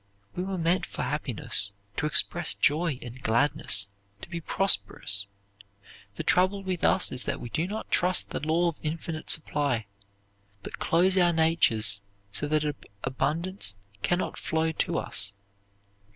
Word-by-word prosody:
We 180 Hz, -, -2 dB
were 190 Hz, 0 st, -3 dB
made 170 Hz, +2 st, +1 dB
for -, -, -5 dB
happiness, 100 Hz, -, +1 dB, 0.3 s
to 150 Hz, -, 0 dB
express 175 Hz, +2 st, +2 dB
joy 155 Hz, -1 st, +1 dB
and 120 Hz, +2 st, -10 dB
gladness, 120 Hz, -3 st, +3 dB, 0.4 s
to -, -, -8 dB
be 170 Hz, -1 st, -5 dB
prosperous. 100 Hz, -, +1 dB, 0.9 s
The -, -, -4 dB
trouble 185 Hz, +2 st, +2 dB
with 185 Hz, -2 st, -3 dB
us -, -, +3 dB
is 125 Hz, -, -1 dB
that 140 Hz, 0 st, -2 dB
we 120 Hz, -, -7 dB
do 165 Hz, +3 st, -1 dB
not 215 Hz, +3 st, -6 dB
trust 180 Hz, +1 st, +3 dB
the -, -, -2 dB
law 160 Hz, +3 st, +1 dB
of 165 Hz, -, -9 dB
infinite 160 Hz, 0 st, -5 dB
supply, 145 Hz, -7 st, +2 dB, 0.8 s
but -, -, -8 dB
close 185 Hz, +3 st, +2 dB
our 175 Hz, -1 st, +5 dB
natures 115 Hz, -11 st, +3 dB, 0.3 s
so 145 Hz, -, -1 dB
that 155 Hz, 0 st, +1 dB, 0.4 s
abundance 160 Hz, -, -1 dB, 0.2 s
cannot 175 Hz, -, -1 dB
flow 160 Hz, 0 st, 0 dB
to 165 Hz, +1 st, -1 dB
us. 100 Hz, -1 st, 0 dB
160 Hz, 145 wpm, -27 LUFS, 125-175 Hz, 0.9 s, our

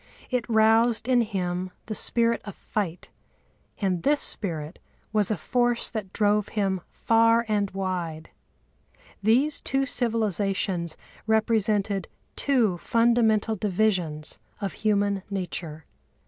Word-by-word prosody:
It 250 Hz, -2 st, -1 dB
roused 225 Hz, +1 st, +4 dB
in 250 Hz, -2 st, +4 dB
him 185 Hz, -4 st, -2 dB, 0.2 s
the 220 Hz, -, -4 dB
spirit 230 Hz, +2 st, +1 dB
of 205 Hz, -, -8 dB
fight, 185 Hz, -5 st, -4 dB, 0.7 s
and 185 Hz, -4 st, 0 dB
this 290 Hz, -, +3 dB
spirit 160 Hz, -5 st, -2 dB, 0.3 s
was 210 Hz, -2 st, +2 dB
a 215 Hz, -, 0 dB
force 240 Hz, +7 st, 0 dB
that 210 Hz, -5 st, -5 dB
drove 210 Hz, -1 st, +2 dB
him 190 Hz, -3 st, +1 dB
far 230 Hz, +1 st, +3 dB
and 205 Hz, -2 st, +1 dB
wide. 180 Hz, -5 st, -4 dB, 0.9 s
These 255 Hz, +9 st, +2 dB
two 270 Hz, 0 st, 0 dB
civilisations 200 Hz, -8 st, -1 dB, 0.3 s
represented 215 Hz, -3 st, +1 dB, 0.3 s
two 230 Hz, -11 st, +1 dB
fundamental 230 Hz, -1 st, +2 dB
divisions 185 Hz, -6 st, -1 dB, 0.2 s
of 200 Hz, -2 st, -3 dB
human 205 Hz, -2 st, +1 dB
nature. 175 Hz, -5 st, -5 dB
210 Hz, 110 wpm, -26 LUFS, 185-230 Hz, 0.9 s, roused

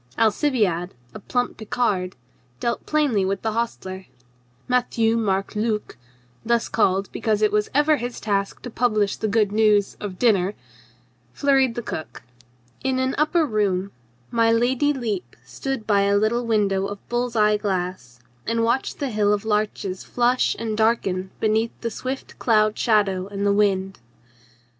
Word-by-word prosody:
Alcibiade, 215 Hz, -, +1 dB, 0.2 s
a -, -, -8 dB
plump 245 Hz, +4 st, -2 dB
Picard, 205 Hz, -4 st, -1 dB, 0.4 s
dealt 235 Hz, -, -2 dB
plainly 290 Hz, -10 st, +2 dB
with 195 Hz, +1 st, -2 dB
the 220 Hz, -, 0 dB
hostler. 190 Hz, -5 st, -4 dB, 0.6 s
Matthieu 240 Hz, -2 st, +1 dB
Marc 200 Hz, -3 st, -1 dB
Luc 215 Hz, 0 st, -2 dB, 0.5 s
(thus 235 Hz, 0 st, +1 dB
called 195 Hz, -3 st, +1 dB
be -, -, -7 dB
cause 215 Hz, -1 st, +1 dB
it 215 Hz, -, +4 dB
was 210 Hz, 0 st, +1 dB
ever 295 Hz, +1 st, +4 dB
his 245 Hz, -1 st, -5 dB
task 200 Hz, -2 st, -2 dB
to 245 Hz, -, -6 dB
publish 215 Hz, -4 st, +1 dB
the 220 Hz, -, -2 dB
good 210 Hz, -1 st, +2 dB
news 210 Hz, -2 st, +3 dB
of 195 Hz, -3 st, -6 dB
dinner) 200 Hz, -4 st, +2 dB, 0.8 s
flurried 270 Hz, -4 st, +2 dB
the 240 Hz, -, -4 dB
cook. 155 Hz, -7 st, -6 dB, 0.6 s
In 265 Hz, -1 st, 0 dB
an 260 Hz, +1 st, 0 dB
upper 315 Hz, +2 st, +3 dB
room 200 Hz, -5 st, 0 dB, 0.4 s
my 230 Hz, -1 st, +3 dB
Lady 250 Hz, +5 st, +2 dB
Lepe 215 Hz, -, -4 dB
stood 220 Hz, -, -4 dB
by 200 Hz, -2 st, +3 dB
a 200 Hz, 0 st, +3 dB
little 230 Hz, +3 st, +1 dB
window 200 Hz, -3 st, +1 dB
of 200 Hz, 0 st, -9 dB
bull's 240 Hz, 0 st, -2 dB
eye 210 Hz, -1 st, +4 dB
glass 180 Hz, -, -3 dB, 0.3 s
and 230 Hz, 0 st, +1 dB
watched 235 Hz, +3 st, 0 dB
the 275 Hz, -3 st, -3 dB
hill 210 Hz, -1 st, +2 dB
of 210 Hz, +1 st, 0 dB
larches 210 Hz, -3 st, -1 dB
flush 245 Hz, +1 st, +1 dB
and 225 Hz, -2 st, -3 dB
darken 200 Hz, -4 st, +1 dB
beneath 220 Hz, +1 st, 0 dB
the 230 Hz, -, -2 dB
swift 260 Hz, +4 st, -6 dB
cloud 215 Hz, -2 st, +3 dB
shadow 195 Hz, -4 st, +1 dB
and 200 Hz, 0 st, -3 dB
the 200 Hz, -, +3 dB
wind. 195 Hz, -2 st, +1 dB
215 Hz, 155 wpm, -23 LUFS, 200-235 Hz, 0.8 s, it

